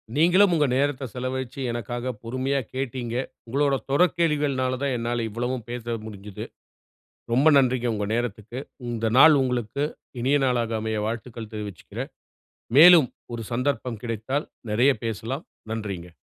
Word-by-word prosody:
நீங்களும் 180 +5 +5
உங்க 150 -2 +3
நேரத்த 140 0 0
செலவழிச்சு, 130 0 -4
எனக்காக 120 +2 -3
பொறுமையா 130 +4 -1
கேட்டீங்க. 130 -2 -3 0.3
உங்களோட 140 +3 +2 0.2
தொடர் 180 +6 +3
கேள்விகள்னால 145 -6 +1
தான் 135 -2 0
என்னால 120 0 -1
இவ்வளவும் 120 +2 -3
பேச 120 -1 -5 0.2
முடிஞ்சுது. 105 -2 -8 0.9
ரொம்ப 135 +6 +4
நன்றிங்க 125 -2 +2
உங்க 105 -1 -2
நேரத்துக்கு. 120 0 -3 0.3
இந்த 115 -1 -1
நாள் 155 +3 +9
உங்களுக்கு 125 +1 -1 0.4
இனிய 140 +4 +3
நாளாக 120 -3 0
அமைய 110 0 -1
வாழ்த்துக்கள் 115 0 -5
தெரிவிச்சுக்கறேன். 105 -5 -6 0.7
மேலும், 165 -3 +9 0.3
ஒரு 115 -1 -4
சந்தர்ப்பம் 125 -2 -1
கிடைத்தால் 120 +5 -2 0.2
நெறைய 125 +6 +4
பேசலாம். 115 - -4 0.3
நன்றிங்க. 100 -6 -5
125 Hz, 125 wpm, -25 LUFS, 115-140 Hz, 0.9 s, நாள்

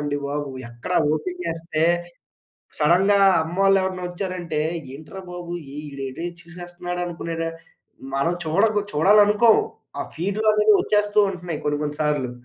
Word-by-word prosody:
అండి 145 -1 -1
బాబు. 145 0 -3 0.2
ఎక్కడ 120 +8 -7 0.2
ఓపెన్ 180 +4 -3
చేస్తే, 165 -1 -2 1.0
సడన్‌గా 180 +6 +4 0.3
అమ్మోళ్ళెవరన్నా 190 +1 +1
వచ్చారంటే 175 -3 -3 0.3
ఏంట్రా 155 +7 -9
బాబు! 175 -1 -6 0.3
ఈడేటో 140 +1 -6 0.2
చూసేస్తున్నాడనుకునేలా, 175 -1 -5 0.7
మనం 140 +6 +1
చూడగు 205 +6 +2
చూడాలనుకోము. 210 +7 +5 0.4
ఆ - - -1
ఫీడ్‌లనేది 210 +5 +3
వచ్చేస్తూ 210 0 0
ఉంటున్నయి, 175 -4 -5
కొన్ని 145 0 0
కొన్ని 150 0 -3
సార్లు. 145 -4 0
175 Hz, 105 wpm, -23 LUFS, 150-195 Hz, 1.0 s, చూడాలనుకోము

